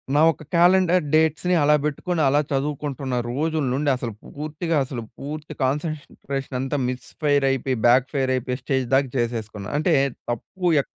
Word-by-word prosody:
నా 150 - +5
ఒక 155 - -11
కాలెండర్ 180 0 +4
డేట్స్‌ని 160 +3 +3
అలా 150 +1 +5
పెట్టుకొని 160 +3 -1
అలా 140 +2 +4
చదువుకుంటున్న 140 -2 -2
రోజుల 155 +4 -1
నుండి 145 +2 0
అసలు 120 -3 -4 0.2
పూర్తిగా 155 +3 -3
అసలు 125 -2 -5 0.2
పూర్తి 150 +2 -6
కాన్సన్‌ట్రేషన్ 140 -1 -3
అంతా 135 +2 -1
మిస్‌ఫై‌ర్ 140 +3 0
అయిపోయి, 135 -1 0
బ్యాక్‌ఫైర్ 130 +2 +3
అయిపోయి 125 0 -2
స్టేజ్ 130 0 0
దాక 135 +1 +4
చేసేసుకున్న. 110 -4 -3
అంటే 160 +2 +2 0.4
తప్పు 180 +10 -5 0.2
ఎక్ - - -14
140 Hz, 140 wpm, -23 LUFS, 130-155 Hz, 0.4 s, నా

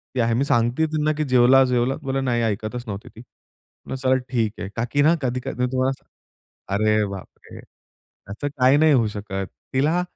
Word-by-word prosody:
ती - - -1
आहे 115 0 +1
मी 125 - +1
सांगते 120 +4 +1
त्यांना 155 0 0
की 155 - 0
जेवला, 130 0 +5
जेवला. 125 +1 +1
बोला, 135 -1 -1
नाही 120 -3 0
ऐकतच 110 +3 -3
नव्हती 100 0 -6
ती. 115 - -11 0.7
चला 130 0 +1 0.2
ठीक 115 -4 0
आहे. 95 - -5
का 115 - -1
की 145 - +2
ना 155 +3 +5
कधी-कधी 125 0 -3
मी - - +4
तुम्हाला, 130 +1 +1 0.8
अरे 110 +1 +2
बापरे! 100 -1 -10 0.7
असं 145 +8 -4
काही 135 -1 +3
नाही 155 0 +5
होऊ 120 -5 +3
शकत. 100 -2 -5 0.3
तिला 155 +7 +2
125 Hz, 175 wpm, -22 LUFS, 115-135 Hz, 0.8 s, जेवला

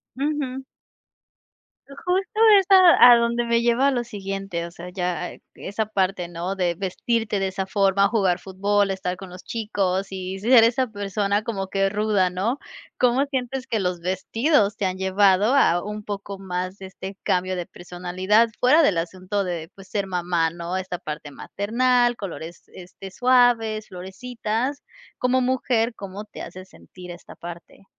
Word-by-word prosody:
Ujú. 270 -1 -2 1.2
Justo 365 +9 -2 0.2
es 385 - -1
a 365 -9 +8
a - - +8
donde 235 0 +1
me 235 0 +2
lleva 240 +4 +3
lo 245 -2 -1
siguiente, 195 -5 -5
o - - -12
sea, 175 +1 -9
ya 180 -1 -3 0.2
esa 215 +2 -3
parte, 190 -3 -1
¿no? 175 +3 -4
De 180 -3 0
vestirte 210 +3 -1
de 195 - 0
esa 190 0 -3
forma, 195 0 +2
jugar 195 -5 +1
fútbol, 200 +1 0
estar 185 -1 -3
con 190 0 -10
los 180 0 -11
chicos 200 -4 -2
y 190 0 -5
ser 230 +3 +6
esa 245 +3 +2
persona 205 0 -1
como 200 -4 -3
que 195 0 +1
ruda, 205 -2 +1
¿no? 205 +9 -2 0.4
¿Cómo 250 +2 +3
sientes 265 -1 -3
que 225 - -1
los 180 -2 -1
vestidos 205 - +1
te 200 - -1
han 185 0 -2
llevado 195 +4 +3
a 175 -10 +3
un 210 +1 -6
poco 200 -1 -6
más 185 0 -4
de 195 - -9
este 190 +1 -9
cambio 185 +1 0
de 175 -1 -4
personalidad 185 +6 0
fuera 295 +6 +5
del 200 - +3
asunto 185 +4 -3
de 170 -3 -4
pues 195 -1 -14
ser 200 -2 -1
mamá, 175 -3 0
no? 170 +2 -4
Esta 185 -2 -4
parte 150 -1 -7
maternal, 240 - +1
colores, 170 -5 -8
este, 185 +1 -11
suaves, 240 -2 +3
florecitas. 230 +7 -4 0.3
Como 255 +1 +1
mujer 245 -2 +1
¿cómo 200 +1 -8
te 210 - -11
hace 185 +2 -8
sentir 180 -1 -13
esta 175 - -12
parte? 170 +3 -11
200 Hz, 160 wpm, -23 LUFS, 185-235 Hz, 1.2 s, a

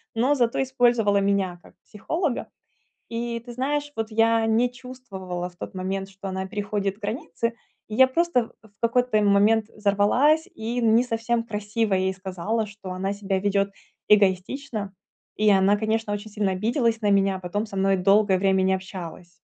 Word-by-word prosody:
но 255 +6 +2
зато 240 -1 +1
использовала 240 -6 +2
меня 195 -3 0
как - - -17
психолога. 300 - -3 0.6
И 235 0 -3
ты 240 - -8
знаешь, 290 +4 -2
вот 225 -1 -3
я 225 +1 +3
не 230 +3 +3
чувствовала 205 -9 -7
в 175 - -23
тот 180 - -8
момент, 190 +1 -3
что 195 0 -9
она 190 0 -3
переходит 200 -1 -2
границы. 220 0 -3 0.4
Я 260 +5 +6
просто 260 -4 +1
в - - -16
в 200 - -40
какой-то 235 -1 +2
момент 205 +2 +4
взорвалась 220 - +2
и 230 +3 -3
не 230 +1 +4
совсем 230 -1 -1
красиво 210 -1 -1
ей 190 0 +1
сказала, 190 +4 -3
что 200 -2 -9
она 190 +2 -2
себя 195 -1 -2
ведет 200 0 +1 0.4
эгоистично. 205 +2 +1 0.4
И 215 0 +3
она, 195 0 +4
конечно, 220 0 -1
очень 205 +1 -5
сильно 205 -1 0
обиделась 230 +3 0
на 205 - +1
меня, 195 -1 +2
потом 185 +4 -3
со 205 - -10
мной 195 0 +2
долгое 195 +1 +4
время 190 0 +2
не 190 0 +3
общалась. 180 -2 -8
210 Hz, 165 wpm, -24 LUFS, 195-230 Hz, 0.6 s, Я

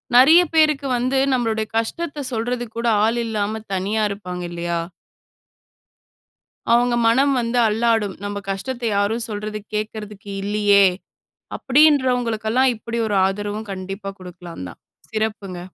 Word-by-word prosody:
நிறைய 300 +8 +8
பேருக்கு 305 -3 +3
வந்து 255 +2 0 0.2
நம்பளுடைய 225 -3 0
கஷ்டத்த 290 +6 -3
சொல்றதுக்கு 240 0 -3
கூட 235 - -1 0.2
ஆள் 230 +2 +1
இல்லாம, 215 0 -2
தனியா 200 +4 -1
இருப்பாங்க 180 -3 -6
இல்லையா? 170 0 -2 1.9
அவங்க 240 0 +3
மனம் 270 +5 +3
வந்து 235 +1 -1
அல்லாடும். 220 -3 +1
"நம்ம 205 0 -4
கஷ்டத்தை 235 +5 -3
யாரும் 215 +4 0
சொல்றது 210 0 -4 0.2
கேக்கறதுக்கு 210 -1 -5
இல்லையே!" 205 -1 +4 0.7
அப்படின்றவங்களுக்கு 255 -6 +3
எல்லாம், 260 +2 +4
இப்படி 230 +1 -6
ஒரு 205 - -1
ஆதரவும் 205 +2 -3
கண்டிப்பா 195 +1 -6
குடுக்கலாந்தான். 170 - -9 0.3
சிறப்புங்க. 210 -4 -3
220 Hz, 115 wpm, -21 LUFS, 200-245 Hz, 1.9 s, நிறைய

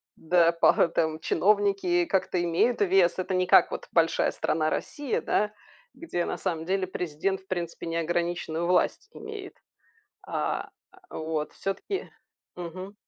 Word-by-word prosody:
да, 170 0 +3
пара 170 0 +4
там 160 -1 -1
чиновники 195 -3 +2
как-то 180 -2 0
имеют 175 +8 +1
вес. 190 -2 +3
Это 185 +1 -2
не 185 0 +2
как - - +6
вот - - -5
большая 165 -1 +2
страна 155 0 0
Россия, 290 -4 -2
да, 210 0 +1 0.4
где 175 - -3
на - - -3
самом 165 -1 -3
деле 190 0 0
президент 180 +2 -2
в 190 - -29
принципе 170 -2 -4
неограниченную 170 0 -1
власть 180 - +1
имеет. 425 -3 -8 0.7
А - - -2 0.4
а, - - -6
вот 155 -1 -3
всё-таки 380 - -4 0.5
Мгм. 185 +3 -7
175 Hz, 140 wpm, -27 LUFS, 165-195 Hz, 0.7 s, как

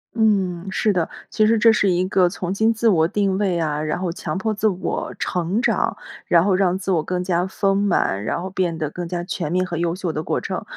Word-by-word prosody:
嗯， 195 -5 +1
是 205 +2 +1
的。 175 -3 0 0.2
其 215 -1 +3
实 230 - +3
这 225 +1 +6
是 200 - +2
一 180 0 +1
个 185 -2 +3
重 180 0 -4
新 220 +3 +2
自 230 +1 0
我 165 -6 +4
定 200 0 0
位 185 -4 +1
啊， 150 -2 -1
然 155 +3 -2
后 180 -2 -2
强 190 +1 -4
迫 220 +3 -1
自 210 +1 +1
我 185 -3 -2
成 180 +4 -1
长， 245 - 0 0.3
然 170 0 +4
后 200 - +3
让 185 -1 +2
自 190 0 -3
我 170 -4 +2
更 180 +3 -2
加 180 0 0
丰 195 0 0
满， 175 - +1
然 - - -2
后 185 - -4
变 180 -3 -1
得 155 -2 -3
更 175 +1 -5
加 175 0 -3
全 170 -3 -4
面 185 +1 +1
和 175 - -5
优 170 0 0
秀 180 -3 -3
的 155 - -2
过 - - -1
程。 - - -4
185 Hz, 260 characters per minute, -21 LUFS, 170-200 Hz, 0.3 s, 这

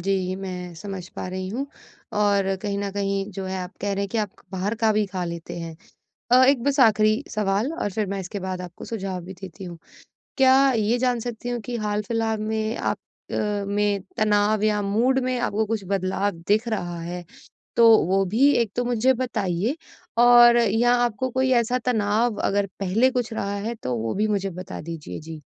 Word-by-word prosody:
जी, 185 0 0
मैं 180 -2 -6
समझ 190 0 -7
पा - - -6
रही 185 0 -4
हूँ 260 +7 -3 0.5
और 200 -2 +2
कहीं 200 -1 -2
न 200 0 -2
कहीं 200 0 -1
जो 190 +1 -5
है 190 0 -3
आप 180 +1 -6
कह 200 0 -1
रहे 200 - -1
हैं, 200 - -3
कि 225 - -2
आप 210 -3 -1 0.2
बाहर 190 +4 -1
का 220 - +5
भी 210 0 +2
खा 185 -2 -4
लेते 170 0 -6
हैं 165 -1 -7 0.6
अ, 255 +1 +8
एक 270 -4 +3
बस 285 0 +1
आखिरी 215 +1 +4
सवाल 210 +6 0
और 205 - -2
फिर 215 0 -1
मैं 195 0 -3
इसके 190 +2 -6
बाद 185 -1 -4
आपको 175 -1 -9
सुझाव 195 -5 -4
भी 190 - -8
देती 190 -1 -9
हूँ। 175 -2 -8 0.6
क्या 270 0 +5
ये 225 +3 +1
जान 245 -1 +1
सकती 240 +1 -5
हूँ 240 -1 -2
कि 240 +2 -5
हाल-फिलहाल 220 +1 -1
में 220 +1 -1
आप - - -1 0.3
अ, - - -1 0.3
में 205 -1 0
तनाव 210 -1 +2
या 210 -1 +2
मूड 230 +7 +2
में 255 -1 0
आपको 215 -1 0
कुछ 220 -2 -2
बदलाव 195 +1 0 0.2
दिख 215 +3 +2
रहा 175 -6 -3
है? 175 +1 -6 0.5
तो 230 -1 +8
वो 195 +1 +2
भी 240 +10 +4
एक 210 - -5
तो 245 - +1
मुझे 245 +2 +3
बताइए 220 - -1 0.4
और 240 0 +8
या 235 +2 +3
आपको 240 +3 -2
कोई 260 +1 +1
ऐसा 245 +2 0
तनाव 220 0 +1
अगर 200 0 +1
पहले 215 +7 +3
कुछ 245 -3 -2
रहा 200 -2 -2
है, 220 +4 -3
तो 125 - -3
वो 115 0 -2
भी 210 +2 +1
मुझे 200 -2 0
बता 180 +1 -7
दीजिए। 165 -1 -7
जी। 160 -1 -9
205 Hz, 200 wpm, -24 LUFS, 190-230 Hz, 0.6 s, अ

